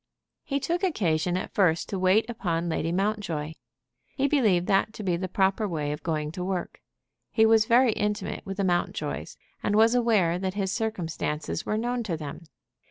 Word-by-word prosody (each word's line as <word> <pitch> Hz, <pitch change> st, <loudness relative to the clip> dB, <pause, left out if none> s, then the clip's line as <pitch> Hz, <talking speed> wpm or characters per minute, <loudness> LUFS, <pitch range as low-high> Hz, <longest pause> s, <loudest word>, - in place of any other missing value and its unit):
He 280 Hz, 0 st, -1 dB
took 340 Hz, +7 st, -2 dB
occasion 180 Hz, -, +1 dB
at 185 Hz, -, -5 dB
first 170 Hz, -5 st, +2 dB
to 195 Hz, -, -2 dB
wait 190 Hz, +4 st, +3 dB
upon 175 Hz, -7 st, -2 dB
Lady 165 Hz, 0 st, -1 dB
Mountjoy. 180 Hz, -6 st, -1 dB, 0.6 s
He 275 Hz, 0 st, +2 dB
believed 215 Hz, -, +3 dB
that 195 Hz, +3 st, +2 dB
to 215 Hz, -, -7 dB
be 180 Hz, -3 st, +1 dB
the 185 Hz, +2 st, -3 dB
proper 195 Hz, +3 st, +1 dB
way 150 Hz, -5 st, -2 dB
of 150 Hz, +1 st, -5 dB
going 150 Hz, -1 st, -2 dB
to 180 Hz, +2 st, -5 dB
work. 185 Hz, -2 st, -4 dB, 0.5 s
He 220 Hz, -, +4 dB
was 220 Hz, -1 st, +5 dB
very 240 Hz, +1 st, +5 dB
intimate 210 Hz, 0 st, -2 dB
with 195 Hz, -1 st, -6 dB
the 200 Hz, -, 0 dB
Mountjoys, 175 Hz, -2 st, -2 dB, 0.2 s
and 205 Hz, -, 0 dB
was 225 Hz, +2 st, +5 dB
aware 210 Hz, -8 st, +2 dB
that 190 Hz, 0 st, -3 dB
his 195 Hz, -2 st, -1 dB
circumstances 165 Hz, -8 st, -3 dB
were 215 Hz, -, 0 dB
known 240 Hz, +2 st, -1 dB
to 185 Hz, -8 st, -3 dB
them. 155 Hz, +2 st, -7 dB
195 Hz, 180 wpm, -27 LUFS, 170-220 Hz, 0.6 s, was